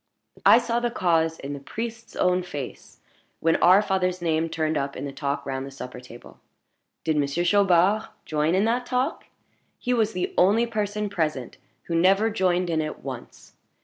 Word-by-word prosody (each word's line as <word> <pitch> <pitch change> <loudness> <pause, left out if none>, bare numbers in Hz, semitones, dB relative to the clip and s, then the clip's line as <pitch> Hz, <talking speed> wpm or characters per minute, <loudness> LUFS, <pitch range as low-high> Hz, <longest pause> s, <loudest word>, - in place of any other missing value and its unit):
I - - +9
saw 235 -1 0
the 240 0 0
cause 165 -7 +1
in 140 +1 -6
the 140 - -6
priest's 230 +9 -7
own 180 0 +2
face 145 -7 -8 0.4
when 165 0 +2
our 185 +4 +6
father's 185 -2 0
name 165 -1 0
turned 160 -1 -1
up 140 -1 -2
in 135 - -5
the 140 - -5
talk 140 0 -3
round 135 0 -3
the 135 - -7
supper 125 -2 -8
table. 120 -1 -14 0.6
Did 160 -2 0
Monsieur 145 +4 0
Chaubard 195 +2 +3 0.2
join 155 +2 +1
in 195 +3 +3
that 245 +2 0
talk? 255 +4 -1 0.5
He 250 - -1
was 225 -2 +1
the 180 - -2
only 210 +6 +4
person 210 -2 -2
present 155 -10 -3 0.3
who 170 - -5
never 195 +6 +3
joined 180 -3 +1
in 160 -1 +1
it 155 0 -6
once. - - -9
180 Hz, 180 wpm, -25 LUFS, 155-210 Hz, 0.6 s, I